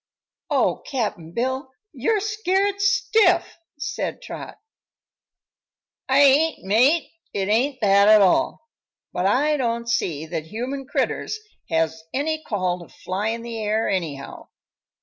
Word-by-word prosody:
"Oh, - - +2
Cap'n 210 - -3
Bill! 260 - -2 0.2
You're 350 - 0
scared 400 -1 0
stiff," 385 -3 +3 0.2
said 285 - -4
Trot. - - -8 1.5
"I 265 - +4
ain't, 285 +4 +4
mate; 250 - +3 0.2
it 195 0 -1
ain't 255 +5 +1
that 200 -1 +5
at 215 0 +8
all. 200 - +2 0.5
But 180 +1 0
I 295 +8 +2
don't 235 -2 -1
see 160 -9 -1
that 160 0 -4
human 255 +8 -5
critters 435 - -1 0.3
has 160 0 0
any 315 +3 -1
call 185 -7 -1
to 170 - -12
fly 195 +3 -3
in 230 +1 -2
the 230 -1 -5
air, 215 +2 0
anyhow. 155 -8 -4
235 Hz, 130 wpm, -23 LUFS, 195-300 Hz, 1.5 s, at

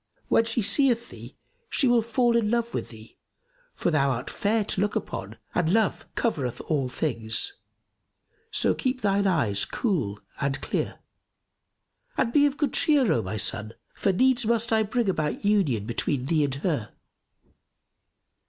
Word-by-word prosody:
When 225 - +4
she 230 0 -1
seeth 235 +2 +2
thee, - - -11 0.3
she 275 - +2
will 240 -1 +4
fall 235 +1 +1
in 225 -3 +2
love 235 0 0
with - - -3
thee; 110 -1 -14 0.6
for 175 - 0
thou 140 -3 +2
art 125 0 -3
fair 215 +2 +1
to 190 - -1
look 205 0 0
upon - - -4 0.2
and 170 -2 +1
love 220 -1 +1
covereth 140 - -1
all 140 -5 -1
things. 125 - -1 1.0
So - - +3
keep 255 -1 -2
thine 200 -1 +2
eyes 115 - +2
cool 140 - -1 0.2
and 140 0 -1
clear[FN#278] - - -2 1.2
and 235 -3 +1
be 290 0 +5
of 285 0 -4
good 290 -5 0
cheer, 285 -7 +3
O 115 - +1
my 105 +2 -4
son, 110 +2 -1 0.2
for 195 - +1
needs 260 +6 +3
must 230 0 +1
I 220 - +4
bring 225 +1 0
about 155 -1 -1
union 170 - +2
between 125 +3 -1
thee 155 0 +2
and 135 -1 -3
her." 140 - -2
200 Hz, 160 wpm, -26 LUFS, -, 1.2 s, be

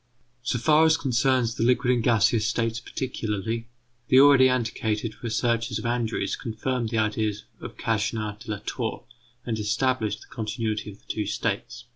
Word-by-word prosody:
So 125 0 -1
far 155 +6 +4
as 160 0 +4
concerns 125 -3 +1
the 115 - -2
liquid 125 +1 +3
and 120 - +1
gaseous 110 -2 +3
states 115 0 -1
particularly, 115 -2 -3 0.4
the 130 - +6
already 135 -2 +7
antiquated 110 -3 -1
researches 115 -1 0
of 110 - -6
Andrews 120 -1 -1
confirmed 120 +1 -3
the 115 - -2
ideas 105 -1 0
of - - -9
Cagniard 110 -1 -1
de 120 - -12
la 105 - -1
Tour 115 -4 -3 0.4
and 115 -2 -2
established 105 0 0
the - - -15
continuity 110 -1 -2
of 100 - -11
the - - -31
two 105 -2 -2
states. 115 +2 -3
115 Hz, 160 wpm, -26 LUFS, 110-125 Hz, 0.4 s, already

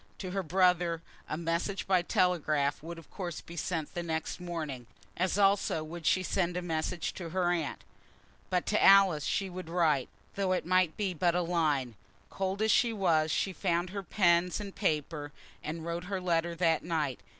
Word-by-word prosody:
To 185 -2 -5
her 195 +1 -1
brother 175 -1 +2 0.3
a 155 - -2
message 170 +4 -2
by 185 -2 +3
telegraph 155 -6 +1
would 170 +2 -7
of 165 - -14
course 175 -4 -5
be 170 - -11
sent 165 -2 -3
the 175 - -3
next 160 0 -3
morning; 155 -9 -5 0.3
as 185 +2 0
also 195 -5 +3
would 160 +1 -6
she 185 - +3
send 180 -1 0
a - - -1
message 165 +1 -2
to 170 -3 -6
her 175 0 +1
aunt. 165 -4 -2 0.7
But 180 -1 0
to 210 - +1
Alice 195 -7 +6
she 195 - 0
would 185 -2 -7
write, 160 -6 +2 0.2
though 195 -2 0
it 185 - -1
might 185 -2 +2
be 200 -3 -1
but 175 +1 +1
a 180 - +2
line. 150 -8 0 0.4
Cold 195 +2 -2
as 220 - +3
she 235 - +4
was, 170 -7 +2
she 190 +4 0
found 175 -1 -1
her 200 0 -4
pens 180 -2 +2
and 200 -2 -6
paper, 150 -4 -2 0.3
and 160 +1 -5
wrote 170 +1 -3
her 195 0 -2
letter 170 -1 0
that 165 -2 +2
night. 155 -6 -1
175 Hz, 185 wpm, -30 LUFS, 160-185 Hz, 0.7 s, Alice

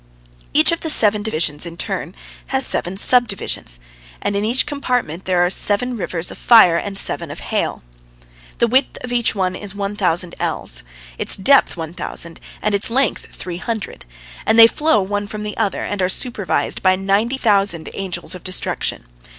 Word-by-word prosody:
Each 310 +3 +4
of 335 - -1
the 320 - -4
seven 210 -7 +5
divisions 155 -8 -1
in 170 -1 -6
turn - - -3 0.3
has - - +1
seven 180 +2 -1
subdivisions, 205 - +1 0.4
and 200 - -2
in 200 - -1
each 235 +4 0
compartment 250 - -3
there 180 -1 +2
are - - 0
seven 240 +6 +2
rivers 175 -5 -2
of - - -11
fire 220 -8 +6
and 195 +2 -4
seven - - 0
of - - -8
hail. - - -2 0.7
The - - +3
width 260 +3 +1
of 250 - -6
each 240 -2 +1
is 190 +1 -3
one 200 0 -4
thousand 180 -3 +1
ells, - - -1 0.4
its - - +3
depth 270 +1 +4
one 160 -1 -6
thousand, 170 -1 -5 0.2
and 210 - 0
its 200 +2 +2
length 255 0 0
three 175 -2 -7
hundred, 220 +2 -6 0.4
and 220 - +1
they 230 - +11
flow 230 -3 +1
one 205 +1 -3
from 210 0 -7
the 210 0 -5
other, 210 -4 -2
and 205 -2 -4
are 180 - +1
supervised 215 -2 0
by 185 -1 +3
ninety 200 +7 0
thousand 200 -8 +1
Angels 185 -2 -2
of 180 - -9
Destruction. 185 - -1
205 Hz, 175 wpm, -18 LUFS, 185-230 Hz, 0.7 s, they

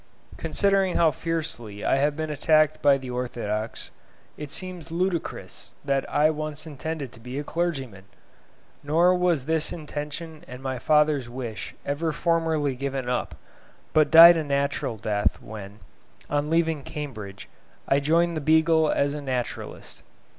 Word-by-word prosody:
Considering 195 -2 +1
how 165 -2 +4
fiercely 150 -10 -4
I - - +3
have 145 +2 +1
been 155 0 -3
attacked 155 +1 +3
by 140 -1 +5
the 130 -2 -7
orthodox, 115 -3 -4 0.4
it 150 -1 -7
seems 175 0 -5
ludicrous 175 0 -3
that 140 -1 0
I 155 +2 +4
once 155 0 -5
intended 155 -2 -5
to - - -16
be 125 +3 -7
a 145 - -2
clergyman. 135 - -3 0.8
Nor 165 +5 +3
was 175 -7 +1
this 160 0 0
intention 155 0 -6
and 125 +1 -10
my 130 -2 -3
father's 150 -2 +2
wish 120 -5 -6
ever 155 +3 -1
formerly 160 -3 0
given 135 -1 -3
up, 125 0 -2 0.6
but 155 -1 +4
died 165 +1 +10
a 160 - -1
natural 140 -4 -1
death 105 -1 -1
when, 105 -2 -9 0.5
on 145 +1 0
leaving 165 -2 +1
Cambridge, 110 -10 -7 0.4
I 135 - +3
joined 165 +4 +2
the 155 - -2
"Beagle" 160 +1 +4
as 140 0 +1
naturalist. 130 -4 -5
150 Hz, 140 wpm, -25 LUFS, 130-160 Hz, 0.8 s, died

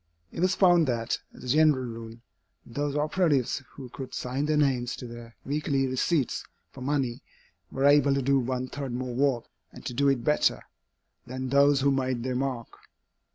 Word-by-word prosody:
It - - -7
was 185 +2 +2
found 175 -4 +5
that, 115 -2 -1
as - - -14
a - - -7
general 150 -1 +4
rule, 115 -1 -7 0.5
those 145 +4 -3
operatives 150 -4 +1
who 135 -2 -9
could 130 +1 -8
sign 130 +4 -2
their 155 0 +2
names 130 -4 +1
to - - -8
their 120 -1 -10
weekly 140 -1 0
receipts 130 +2 0 0.3
for 130 - -12
money, 135 -2 -1 0.5
were 135 +1 -1
able 145 -1 +5
to 140 - +1
do 135 +1 +3
one 130 0 -2
third 135 -2 -5
more 125 0 -3
work, 130 -2 +1 0.3
and - - -13
to - - -3
do 140 +3 +3
it 130 -4 0
better, 150 - +2 0.6
than 130 +1 -4
those 140 +1 +4
who 140 +1 +3
made 130 -3 -1
their 130 0 -2
mark. 130 -3 -3
135 Hz, 180 wpm, -27 LUFS, 125-145 Hz, 0.6 s, found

